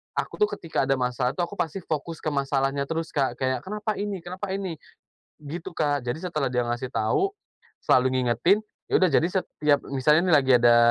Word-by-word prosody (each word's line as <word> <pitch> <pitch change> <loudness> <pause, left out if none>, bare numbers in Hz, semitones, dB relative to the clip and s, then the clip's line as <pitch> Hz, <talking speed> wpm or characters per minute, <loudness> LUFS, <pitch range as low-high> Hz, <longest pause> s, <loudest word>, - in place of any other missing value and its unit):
aku - - -3
tuh 420 - +5
ketika 160 -5 -2
ada 135 - +3
masalah 125 +1 -1
tuh 175 - 0
aku 190 +2 -6
pasti 170 +2 -2
fokus 160 +1 -4
ke 155 - 0
masalahnya 140 0 0
terus, 165 0 -3
Kak, 135 -5 0
kayak, 130 -1 -1
"Kenapa 210 - -4
ini? 200 -4 -3
Kenapa 190 +2 -4
ini?" 185 -6 -4 0.6
Gitu, 165 +4 -7
Kak. 145 -4 0
Jadi 140 +8 -3
setelah 155 -6 -1
dia 125 -1 +1
ngasih 120 +2 -2
tahu, 385 - 0 0.5
selalu 130 0 +3
ngingetin, 125 - +3 0.3
ya - - -1
udah 185 -3 +3
jadi 155 - +3
setiap 150 -6 +1
misalnya 140 +4 +4
nih - - +6
lagi 135 -2 +4
ada, 120 0 +6
150 Hz, 195 wpm, -25 LUFS, 130-175 Hz, 0.6 s, nih